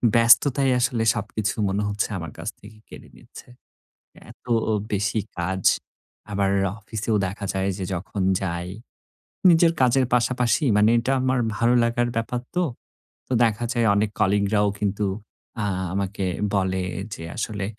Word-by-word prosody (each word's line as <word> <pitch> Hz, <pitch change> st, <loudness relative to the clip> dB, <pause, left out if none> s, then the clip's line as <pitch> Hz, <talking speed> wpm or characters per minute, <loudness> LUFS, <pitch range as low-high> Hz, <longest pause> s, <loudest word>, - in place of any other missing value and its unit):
ব্যস্ততায় 125 Hz, +4 st, +5 dB
আসলে 120 Hz, -2 st, +1 dB
সবকিছু 110 Hz, 0 st, -2 dB
মনে 100 Hz, +2 st, -1 dB
হচ্ছে 105 Hz, +1 st, -1 dB
আমার 85 Hz, -4 st, -6 dB
কাছ -, -, -3 dB
থেকে 110 Hz, +1 st, -14 dB
কেড়ে -, -, -12 dB
নিচ্ছে। -, -, -14 dB, 0.8 s
এতো 125 Hz, -, -10 dB, 0.4 s
বেশি 100 Hz, +2 st, 0 dB, 0.2 s
কাজ। 95 Hz, +2 st, -2 dB, 0.7 s
আবার 100 Hz, -1 st, +1 dB, 0.3 s
অফিসেও 110 Hz, +1 st, -3 dB
দেখা 100 Hz, +2 st, -6 dB
যায় 95 Hz, 0 st, 0 dB
যে 95 Hz, -, -4 dB
যখন 95 Hz, +3 st, -4 dB, 0.2 s
যাই, 85 Hz, -2 st, -3 dB, 0.8 s
নিজের 165 Hz, 0 st, +5 dB
কাজের 130 Hz, +1 st, +4 dB
পাশাপাশি 125 Hz, +4 st, +1 dB
মানে 105 Hz, +1 st, +5 dB
এটা 125 Hz, +3 st, 0 dB
আমার 130 Hz, -1 st, +1 dB, 0.2 s
ভালো 120 Hz, +1 st, +3 dB
লাগার 120 Hz, +1 st, 0 dB
ব্যাপার 115 Hz, +2 st, -2 dB, 0.2 s
তো। 180 Hz, -, +3 dB, 0.6 s
তো -, -, -2 dB
দেখা 115 Hz, 0 st, +1 dB
যায় 120 Hz, -1 st, +1 dB
অনেক 105 Hz, +1 st, +1 dB
কলিগ 100 Hz, +1 st, +3 dB
রাও 105 Hz, 0 st, +3 dB
কিন্তু 105 Hz, 0 st, -1 dB, 0.6 s
আ -, -, -1 dB, 0.3 s
আমাকে 100 Hz, 0 st, -2 dB, 0.3 s
বলে 95 Hz, -1 st, 0 dB, 0.3 s
যে, 80 Hz, -, -7 dB
আসলে 105 Hz, -3 st, -3 dB
105 Hz, 140 wpm, -23 LUFS, 100-120 Hz, 0.8 s, ব্যস্ততায়